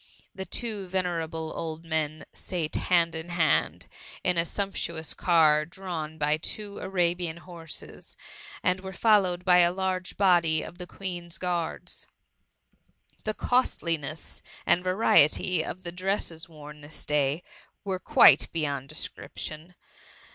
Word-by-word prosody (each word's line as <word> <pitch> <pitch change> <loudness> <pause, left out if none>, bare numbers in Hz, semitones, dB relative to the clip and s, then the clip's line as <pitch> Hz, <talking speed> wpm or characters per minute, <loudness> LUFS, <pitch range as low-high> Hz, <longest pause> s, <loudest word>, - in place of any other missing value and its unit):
The 190 - -6
two 215 -4 -3
venerable 165 -3 -2
old 160 0 -5
men 155 -1 -2
sate 170 -5 -4
hand 170 -2 +2
in 160 +1 -6
hand 175 -2 +2 0.4
in 180 - +2
a 170 0 +2
sumptuous 170 -4 -2
car 155 -3 +4
drawn 165 -2 -6
by 150 0 +2
two 205 +5 -4
Arabian 175 -3 -1
horses, 170 -2 -9 0.5
and 185 +1 +2
were 190 0 -7
followed 185 -3 +3
by 180 -1 +6
a 175 0 +5
large 185 0 -2
body 170 -5 +3
of 175 - -10
the 180 - -7
Queen's 175 -3 -5
guards. 175 -3 -4 1.2
The 215 0 -1
costliness 165 - -1 0.2
and 180 - +3
variety 185 -3 +4
of 185 +3 -7
the 170 - -6
dresses 180 -3 -2
worn 150 -1 -12
this 145 +1 -7
day 150 +2 +1 0.4
were 190 -2 -2
quite - - +6
beyond 140 -4 -2
description. 155 +2 -6
170 Hz, 125 wpm, -27 LUFS, 160-185 Hz, 1.2 s, by